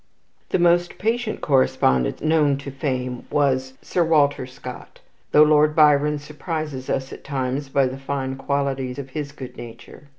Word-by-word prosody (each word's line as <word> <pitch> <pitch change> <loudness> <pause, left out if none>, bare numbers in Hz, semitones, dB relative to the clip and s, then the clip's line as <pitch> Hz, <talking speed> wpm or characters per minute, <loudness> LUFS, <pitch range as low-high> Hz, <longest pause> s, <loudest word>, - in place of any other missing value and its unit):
The - - +1
most 175 0 +2
patient 225 +1 -1
correspondent 65 - +2
known 155 -3 +3
to 140 0 -7
fame 130 -2 -3
was 130 -2 +1
Sir 175 - +1
Walter 145 -5 +2
Scott, 130 - -10 0.3
though 150 - +7
Lord 150 0 +4
Byron 150 -1 +4
surprises 150 -2 -5
us 130 0 -2
at - - -11
times 135 0 -3
by 135 0 +2
the 130 +1 -4
fine 135 -1 -3
quality 135 -1 -1
of 135 -2 -7
his 145 0 -4
good 130 -3 -10
nature. 120 +4 -11
140 Hz, 155 wpm, -22 LUFS, 130-150 Hz, 0.3 s, though